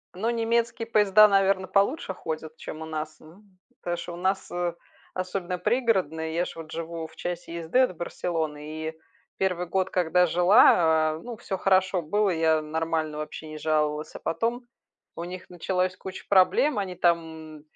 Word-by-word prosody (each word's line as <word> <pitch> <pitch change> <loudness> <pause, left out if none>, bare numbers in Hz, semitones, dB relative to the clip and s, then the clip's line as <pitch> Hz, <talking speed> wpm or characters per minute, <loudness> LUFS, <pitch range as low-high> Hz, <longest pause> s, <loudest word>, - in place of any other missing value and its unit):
Ну, 215 +5 -1
немецкие 230 0 0
поезда, 210 -1 +6
наверно, 195 -1 +2
получше 200 - +1
ходят, 160 -1 -6
чем 155 - -8
у - - -5
нас, 155 0 -5
м. 185 +4 -18 0.2
Потому 175 0 -2
что 175 0 -6
у - - -6
нас, 190 +2 -1
э, 175 -1 -1 0.4
особенно 185 0 -3
пригородная, 180 - 0
я 170 +2 0
ж - - -8
вот 160 -1 -9
живу 165 0 -5
в - - -20
часе 175 -1 -5
езды 165 +9 0
от 255 -8 +3
Барселоны, 155 -2 -4
и - - -9 0.4
1 180 -2 0
год, 190 +1 0
когда 180 0 +3
жила, 170 -3 +5
а, 155 - -6
ну, 240 -2 -7
всё 190 - -4
хорошо 185 -1 +2
было, 205 +6 +1
я 160 -2 +2
нормально 155 0 -2
вообще 155 +1 -6
не 155 0 -8
жаловалась, 150 -1 -1
а - - -6
потом 235 +7 -2 0.5
у 170 - -5
них 180 +1 -8
началось 180 +1 -1
куча 190 0 -9
проблем. 200 +8 +4
Они 190 -2 -3
там 160 -3 -1
175 Hz, 170 wpm, -26 LUFS, 160-195 Hz, 0.5 s, поезда